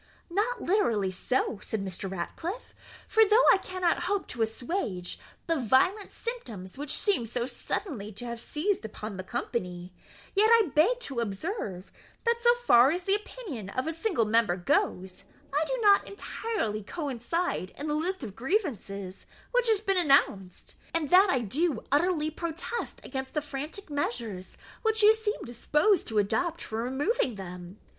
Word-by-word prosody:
"Not 445 +6 0
literally 230 - +1
so," 225 +3 -1
said 210 -3 -3
Mr. 190 +1 -5
Ratcliffe; 330 - -5 0.3
"for 445 - +5
though 440 +3 +5
I - - +3
cannot 365 -2 -1
hope 400 +2 0
to 235 - -3
assuage 225 - -2 0.3
the 330 -1 +1
violent 275 - +2
symptoms 230 - -6
which 290 +1 0
seem 385 - +2
so 235 +1 -1
suddenly 245 - -4
to 215 +5 -6
have 235 -1 -5
seized 360 +7 -1
upon 215 -1 -6
the 185 - -5
company, 180 -5 -4 0.4
yet 420 +2 +4
I 440 -9 +4
beg 450 +12 +4
to 270 - -4
observe, 200 - -4 0.3
that 470 0 +2
so 475 0 +6
far 265 - +6
as 350 +4 -1
the 390 - +1
opinion 405 - -5
of 255 +6 -2
a 320 - -1
single 330 - 0
member 215 -4 +3
goes, 180 +1 0 0.3
I 300 +2 +2
do - - -1
not 405 -1 +6
entirely 400 - -3
coincide 280 - -2
in 290 - -5
the 300 - -1
list 335 +2 -1
of 205 -5 -7
grievances 225 - -2 0.2
which - - +2
has 430 -2 +3
been 390 -3 +1
announced, 240 - +1 0.2
and 310 -4 -1
that 375 +2 +7
I 260 -7 +2
do 285 - 0
utterly 310 +1 +2
protest 340 +9 -4
against 265 +1 -5
the 300 - +2
frantic 300 +6 -6
measures 235 -9 -3 0.2
which 440 -1 +2
you 430 +1 +9
seem 440 -1 -3
disposed 300 - +2
to 220 - -3
adopt 335 - +1
for 220 +1 -3
removing 265 - 0
them. 180 0 -8
290 Hz, 160 wpm, -28 LUFS, -, 0.4 s, you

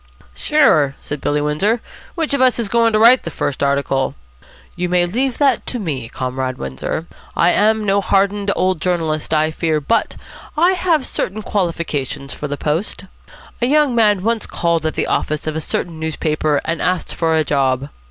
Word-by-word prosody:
"Sure," 155 - +3
said 145 -1 -6
Billy 145 0 0
Windsor. 190 +11 +1 0.4
"Which 320 -4 -1
of 280 - +1
us 255 -1 +4
is 230 -4 -1
going 230 0 +3
to - - +4
write 235 +4 +7
the - - -5
first 145 -3 -3
article?" 140 -1 0 0.6
"You 180 0 -2
may 180 0 +3
leave 245 +8 -1
it 275 -5 +3
to 250 - -3
me, 140 - -4
Comrade 130 0 -3
Windsor. 65 - -4 0.3
I 175 - +4
am 215 +2 +2
no 200 0 +2
hardened 200 +1 +1
old 185 -2 0
journalist, 160 -4 -1
I 155 0 +2
fear, 155 -1 0
but 150 +11 0 0.4
I 345 +4 +5
have 345 -6 +1
certain 210 +3 -3
qualifications 150 -8 -2
for 150 - -5
the 145 0 -4
post. 165 +7 -2 0.6
A 240 - +2
young 295 -1 +3
man 210 -5 +3
once 230 -1 0
called 170 -2 0
at 155 - -3
the - - 0
office 155 0 -1
of 155 -1 -3
a 160 - -2
certain 165 +1 -3
newspaper, 155 -2 0
and 165 0 -2
asked 180 -1 -1
for 165 -1 +1
a 160 - +3
job. 135 -1 0
170 Hz, 180 wpm, -18 LUFS, 150-220 Hz, 0.6 s, write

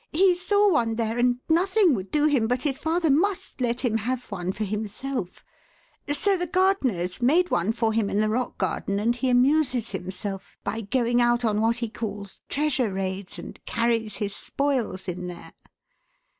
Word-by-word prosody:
He 370 +3 +4
saw 405 +3 +2
one 230 -7 +1
there 225 +1 -1
and 245 0 +2
nothing 370 +2 +3
would 195 -4 -3
do 300 0 +2
him 275 -7 +3
but 250 +1 -1
his 275 -3 -1
father 325 -1 +1
must 360 -1 0
let 240 0 0
him 235 -4 +1
have 250 +2 -3
one 185 -2 -2
for 210 +3 -4
himself; 210 +1 -4 0.7
so 390 +7 +2
the 355 -1 -2
gardeners 280 - +1
made 335 +9 +3
one 175 +5 +2
for 225 -1 0
him 215 -2 +1
in 205 - 0
the 215 - +2
rock 240 +3 -2
garden 200 - -1
and 230 +3 +1
he 255 +1 -1
amuses 255 -1 +2
himself 190 +1 -6
by 225 - -3
going 240 +3 +1
out 240 0 +2
on 215 -1 +1
what 230 +1 +2
he 235 -1 -2
calls 205 -3 -6
'treasure 275 -6 0
raids' 190 0 -4
and - - -10
carries 230 -3 0
his 200 -1 -2
spoils 250 -11 -2
in 180 0 -4
there." 175 -1 -9
240 Hz, 180 wpm, -25 LUFS, 210-290 Hz, 0.7 s, He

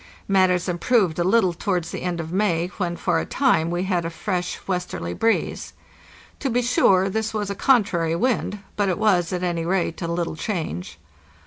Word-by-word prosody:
Matters 185 -2 +3
improved 180 -1 +1
a - - +3
little 190 -1 +3
towards 175 -1 -2
the - - -5
end 175 -1 -2
of 165 +1 -5
May, 180 -4 +1
when 175 -2 -1
for - - 0
a - - -1
time 205 - +2
we 175 +1 -1
had 185 -3 0
a 165 - -2
fresh 180 +1 -3
westerly 180 - -3
breeze. 225 - -1 0.7
To 275 - -1
be 245 +1 +1
sure 195 -5 +4
this 220 +2 -2
was 205 -2 -2
a - - -1
contrary 190 -9 +2
wind, 210 -1 -1
but 205 -2 +1
it 180 - 0
was, 190 -6 +2
at 180 -1 -2
any 170 -2 -1
rate, 175 -1 -1
a 170 - -2
little 170 -1 -2
change. 160 - -4
180 Hz, 190 wpm, -23 LUFS, 170-205 Hz, 0.7 s, sure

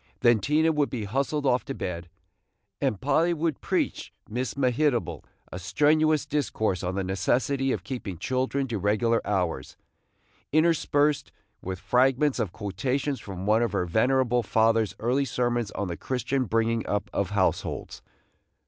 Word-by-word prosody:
Then 120 -3 +5
Tina 155 +9 +2
would 150 -2 +1
be 120 -4 -4
hustled 140 +7 -1
off 125 -1 +2
to 135 -2 -5
bed, 85 -1 -5 0.7
and 130 -8 0
Polly 165 +5 +2
would 160 -2 -2
preach - - -1 0.2
Miss 125 +3 -3
Mehitable 125 - +1 0.3
a 90 - -5
strenuous 150 - +2
discourse 120 -10 -1
on 90 0 -3
the 95 - -1
necessity 125 +8 0
of - - -2
keeping 115 -9 -5
children 130 +6 -1
to 110 -3 -2
regular 110 +4 +2
hours, 90 -9 -2 0.7
interspersed 150 -2 +2 0.3
with 95 0 -4
fragments 130 +8 +2
of 105 -7 -1
quotations 125 +9 -2
from 95 -1 -7
one 110 +2 +3
of 115 -5 0
her 90 - 0
venerable 125 +6 +2
father's 110 0 +2
early 125 +5 +1
sermons 120 -3 -1
on 100 - -3
the 85 -1 -4
Christian 130 +1 -1
bringing 115 +1 +1
up 105 -1 -1
of 100 -2 0
households. 100 -2 -1
120 Hz, 150 wpm, -26 LUFS, 100-140 Hz, 0.7 s, Then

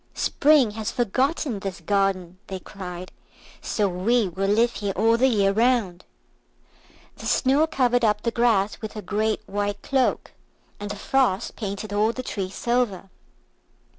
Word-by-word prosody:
"Spring 285 -6 +3
has 220 +1 -4
forgotten 250 +2 0
this 195 0 -5
garden," 195 -3 -1
they 190 - -5
cried, 180 -1 -8 0.5
"so 210 -2 0
we 200 +5 +1
will 195 +3 -2
live 230 +3 +3
here 200 -1 -3
all 225 +3 +3
the 255 +3 +3
year 200 -6 +3
round." 225 -4 +1 1.1
The - - -6
Snow 280 +5 +3
covered 245 -5 +1
up 210 -1 +2
the 235 - 0
grass 225 -4 +1
with 220 - -6
her 215 -2 -7
great 215 +2 -1
white 205 0 -3
cloak, 265 -2 0 0.5
and 205 0 -5
the 205 - -4
Frost 235 -1 0
painted 205 -1 -5
all 215 +2 +2
the 255 - -5
trees 195 -5 -4
silver. 235 -6 -1
215 Hz, 150 wpm, -24 LUFS, 195-240 Hz, 1.1 s, Spring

